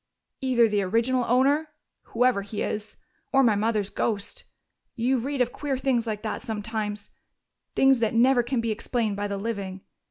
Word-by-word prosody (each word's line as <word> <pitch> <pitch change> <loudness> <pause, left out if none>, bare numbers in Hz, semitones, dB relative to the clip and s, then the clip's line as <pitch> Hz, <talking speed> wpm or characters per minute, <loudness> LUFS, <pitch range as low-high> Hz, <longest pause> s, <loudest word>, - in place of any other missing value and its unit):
"Either 250 -3 +4
the 210 -2 +1
original 230 +6 +1
owner 275 +6 +3 0.4
whoever 245 -3 +2
he 205 +1 -4
is 210 0 -4 0.3
or 270 0 +5
my 230 -4 +4
mother's 210 -1 0
ghost. 205 -3 -3 0.5
You 250 +2 +1
read 275 +2 -2
of 245 0 +1
queer 280 -2 -2
things 255 -3 0
like 215 -1 -3
that 215 - -3
sometimes, 210 -2 -4 0.6
things 270 -2 +5
that 230 0 0
never 245 +2 +5
can 240 0 -1
be 230 -1 -1
explained 220 -1 -1
by 205 +1 -2
the 200 -1 -3
living. 195 -3 -4
230 Hz, 165 wpm, -26 LUFS, 210-255 Hz, 0.6 s, or